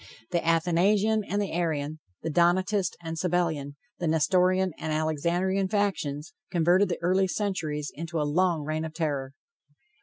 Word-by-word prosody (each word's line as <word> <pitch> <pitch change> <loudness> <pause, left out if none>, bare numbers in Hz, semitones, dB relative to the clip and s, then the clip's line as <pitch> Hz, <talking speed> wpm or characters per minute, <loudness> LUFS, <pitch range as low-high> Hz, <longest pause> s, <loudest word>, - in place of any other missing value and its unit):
The 170 - 0
Athanasian 185 +6 +2
and 205 - -1
the 205 - -2
Arian, 155 -3 -2 0.2
the 160 - -2
Donatist 180 +3 +2
and 165 0 -4
Sabellian, 160 -5 -1 0.2
the 175 - -1
Nestorian 185 +4 +3
and 160 - -3
Alexandrian 170 +5 0
factions 185 -7 -1 0.2
converted 180 +3 +3
the 170 - -1
early 190 +2 +3
centuries 170 -8 -2
into 165 +1 -4
a 150 - +1
long 170 +1 +1
reign 155 +1 -2
of 160 -1 -6
terror. 140 -5 -2
170 Hz, 145 wpm, -27 LUFS, 155-185 Hz, 0.2 s, Nestorian